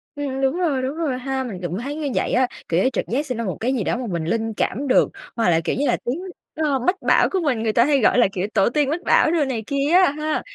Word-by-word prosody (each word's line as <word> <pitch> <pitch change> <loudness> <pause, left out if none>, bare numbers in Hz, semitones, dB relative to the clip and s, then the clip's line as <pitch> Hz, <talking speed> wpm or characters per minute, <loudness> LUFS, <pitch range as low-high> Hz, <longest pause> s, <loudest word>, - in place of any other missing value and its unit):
Ừm, 275 -2 -3
đúng 270 +4 +1
rồi, 300 -8 0
đúng 265 +4 -3
rồi 305 -6 -2
ha! 265 0 -2
Mình 200 -8 -7
cũng 175 +3 -3
thấy 280 +4 -5
như 305 -2 -3
vậy - - 0
á, 255 0 +3 0.2
kiểu 170 +3 +2
như, 260 - +3
trực - - -1
giác 280 +6 -1
sẽ 255 - -3
ra 230 - -3
một 190 -5 -3
cái 250 +4 0
gì 235 - -1
đó 235 - -1
mà 250 - -4
mình 170 -2 -2
linh 225 +5 -1
cảm 275 +6 -2
được, 255 - +4 0.3
hoặc 225 -5 +2
là, 165 -1 +3
kiểu - - -1
như 290 - +1
là, - - +2
tiếng, 250 +7 -2 0.4
ơ, 295 -4 0
mách 360 +10 +1
bảo - - +4
của 385 - 0
mình, 245 -7 0
người 220 - 0
ta 235 - +5
hay 285 -1 +3
gọi - - +4
là, 240 - +5
kiểu, 185 +1 -2
tổ 195 - +3
tiên 285 +2 +1
mách 335 +5 -2
bảo - - +4
đồ 325 -4 +2
này 245 -5 -3
kia 280 +1 0
á 365 -5 +5
ha. 305 +1 -2
260 Hz, 300 wpm, -22 LUFS, 225-290 Hz, 0.4 s, ta